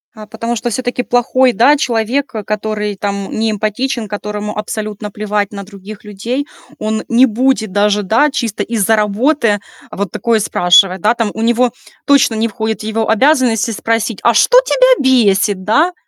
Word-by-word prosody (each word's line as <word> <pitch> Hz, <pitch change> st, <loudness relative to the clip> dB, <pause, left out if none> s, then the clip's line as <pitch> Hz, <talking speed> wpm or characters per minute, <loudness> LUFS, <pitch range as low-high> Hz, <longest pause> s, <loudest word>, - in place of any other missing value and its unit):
А 215 Hz, -1 st, -11 dB
потому 230 Hz, +2 st, -4 dB
что 240 Hz, +2 st, -3 dB
всё-таки 245 Hz, +1 st, -3 dB
плохой, 245 Hz, +1 st, +2 dB
да, 245 Hz, +8 st, +4 dB
человек, 255 Hz, 0 st, -1 dB
который 210 Hz, -1 st, -3 dB
там 200 Hz, 0 st, -4 dB
не 225 Hz, 0 st, -1 dB
эмпатичен, 215 Hz, +3 st, -2 dB
которому 210 Hz, +1 st, -5 dB
абсолютно 210 Hz, 0 st, -5 dB
плевать 210 Hz, -1 st, -2 dB
на 200 Hz, -1 st, -7 dB
других 205 Hz, +2 st, -12 dB
людей, 235 Hz, +8 st, -4 dB, 0.3 s
он 220 Hz, 0 st, -2 dB
не 245 Hz, +2 st, +5 dB
будет 235 Hz, -3 st, 0 dB
даже, 205 Hz, +1 st, +1 dB
да, 230 Hz, +10 st, +2 dB
чисто 230 Hz, -6 st, -2 dB
из-за 225 Hz, -1 st, +1 dB
работы 215 Hz, +2 st, +1 dB, 0.3 s
вот 200 Hz, -3 st, -4 dB
такое 235 Hz, -2 st, 0 dB
спрашивать, 180 Hz, -1 st, +3 dB
да, 215 Hz, +5 st, +3 dB
там 230 Hz, -3 st, -2 dB
у 220 Hz, -, -5 dB
него 240 Hz, +2 st, +2 dB, 0.3 s
точно 280 Hz, -5 st, +3 dB
не 220 Hz, +1 st, 0 dB
входит 220 Hz, 0 st, -4 dB
в -, -, -5 dB
его 220 Hz, 0 st, -2 dB
обязанности 235 Hz, -1 st, +2 dB
спросить: 225 Hz, -1 st, -2 dB
а 235 Hz, -, +4 dB
что -, -, +5 dB
тебя -, -, +3 dB
бесит, 205 Hz, -5 st, +2 dB
да? 305 Hz, -, +2 dB
220 Hz, 165 wpm, -15 LUFS, 210-245 Hz, 0.3 s, не